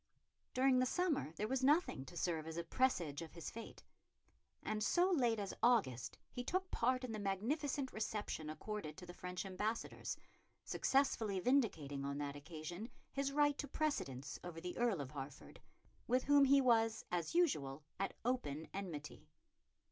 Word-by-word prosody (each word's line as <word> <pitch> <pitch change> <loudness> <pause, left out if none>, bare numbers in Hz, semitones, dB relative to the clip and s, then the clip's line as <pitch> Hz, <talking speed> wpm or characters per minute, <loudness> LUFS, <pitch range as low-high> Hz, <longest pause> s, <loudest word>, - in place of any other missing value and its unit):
During 255 0 +5
the 255 - +3
summer 310 - +1
there 210 +6 -2
was 265 +2 0
nothing 285 - +3
to 175 - -10
serve 160 -2 -1
as 160 0 -5
a 170 - -1
presage 170 - +1
of 165 - -8
his 165 -3 -5
fate; 230 0 -9 0.8
and 215 0 -1
so 360 - +4
late 245 -9 +3
as 200 -2 -3
August 205 - +3
he 245 - -4
took 370 +7 -1
part 255 +2 +2
in 250 - -3
the 215 - -3
magnificent 260 +8 -1
reception 210 -7 -2
accorded 185 0 -5
to 185 - -8
the 175 - -9
French 180 +1 -5
ambassadors, 210 +4 -2 0.5
successfully 225 -8 +2
vindicating 180 - +1
on 140 0 -2
that 145 -1 -3
occasion 170 - -6 0.2
his 275 0 0
right 290 0 +4
to 285 - -2
precedence 150 - -2
over 175 -2 -6
the 180 +1 -5
Earl 235 -9 +2
of 130 - -6
Hertford, 140 -1 -8 0.5
with 250 +2 +3
whom 285 0 +6
he 275 +1 +6
was 225 -3 +3
as 175 - -1
usual 150 - +2 0.2
at 195 - -1
open 160 - -1
enmity. 165 -6 -6
210 Hz, 165 wpm, -39 LUFS, 160-260 Hz, 0.8 s, whom